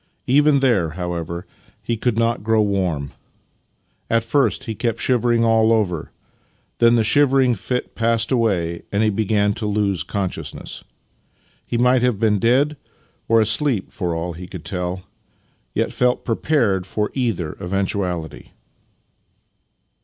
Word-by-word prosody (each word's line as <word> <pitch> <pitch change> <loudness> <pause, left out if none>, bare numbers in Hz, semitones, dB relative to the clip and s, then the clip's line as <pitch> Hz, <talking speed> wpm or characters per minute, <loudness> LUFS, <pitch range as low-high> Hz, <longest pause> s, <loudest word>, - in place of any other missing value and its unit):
Even 145 +1 +4
there, 110 -11 +2
however, 85 -1 -4 0.4
he 115 - -1
could 115 0 -1
not 115 +1 +1
grow 110 +1 +2
warm. 90 -9 -1 1.0
At 115 0 +2
first 135 +5 +1
he 115 - -4
kept 115 +1 -2
shivering 120 -2 +2
all 115 0 +4
over. 95 -8 0 0.7
Then 115 0 +5
the 115 - +3
shivering 135 +1 +4
fit 125 +4 -3
passed 115 +1 +1
away, 95 -9 0
and 105 +2 +1
he 110 - +2
began 105 0 +1
to 105 +1 -4
lose 100 -4 0
consciousness. 95 +4 -5 0.8
He 120 - -1
might 125 +1 +3
have 125 -4 +1
been 105 -2 +2
dead 135 +7 +2 0.5
or 115 0 +4
asleep, 110 0 0
for 90 -4 -3
all 85 +1 -3
he 90 +2 -9
could 90 -4 -9
tell, 90 0 -3 0.7
yet - - 0
felt 125 0 +1
prepared 115 - +1
for 105 +2 -2
either 110 - -1
eventuality. 90 -3 -3
110 Hz, 135 wpm, -21 LUFS, 95-120 Hz, 1.0 s, Then